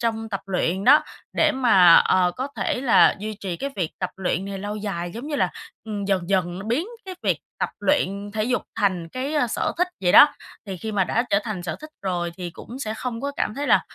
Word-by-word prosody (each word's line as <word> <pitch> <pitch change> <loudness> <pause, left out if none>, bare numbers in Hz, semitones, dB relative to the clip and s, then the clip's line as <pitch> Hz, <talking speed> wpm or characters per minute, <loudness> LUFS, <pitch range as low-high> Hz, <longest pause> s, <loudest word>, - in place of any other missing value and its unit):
trong 225 -1 -2
tập 195 -3 -3
luyện 190 +1 -1
đó, 290 +4 +7 0.4
để 310 -1 +4
mà, 190 - +6
ờ, 180 -1 +4
có 260 +3 -3
thể 245 - -1
là 255 -4 +5
duy 215 +1 -5
trì 185 -4 -4
cái 280 +7 -4
việc 175 -5 -1
tập 185 -1 -2
luyện 190 0 -1
này 195 -1 -5
lâu 205 +2 -4
dài, 185 -5 -4
giống 240 +5 -6
như 300 -1 -2
là, - - +1 0.3
ừm, 210 -2 -4
dần 190 -3 0
dần 180 -2 0
là 195 - -7
biến 295 - 0 0.2
cái 375 -1 -7
việc - - +1 0.2
tập - - -1
luyện 200 -8 0
thể 215 -1 -1
dục 250 +1 0 0.2
thành 180 -5 0
cái, 265 - -4
a, 290 -5 +2
sở 230 - -1
thích 360 +1 +2
vậy 180 -2 +2
đó. - - +10 0.4
Thì 195 -2 -5
khi 215 +5 -5
mà 195 -2 +2
đã 235 +6 +1
trở 200 - +4
thành 205 -6 -4
sở 175 - -4
thích 305 - -10
rồi 175 -3 -2
thì 180 -2 -5
cũng 235 +8 -10
sẽ 220 -5 -3
không 235 0 -4
có 280 +1 -3
cảm 210 - -1
thấy 285 +3 -3
là, - - +5
205 Hz, 245 wpm, -23 LUFS, 185-250 Hz, 0.4 s, đó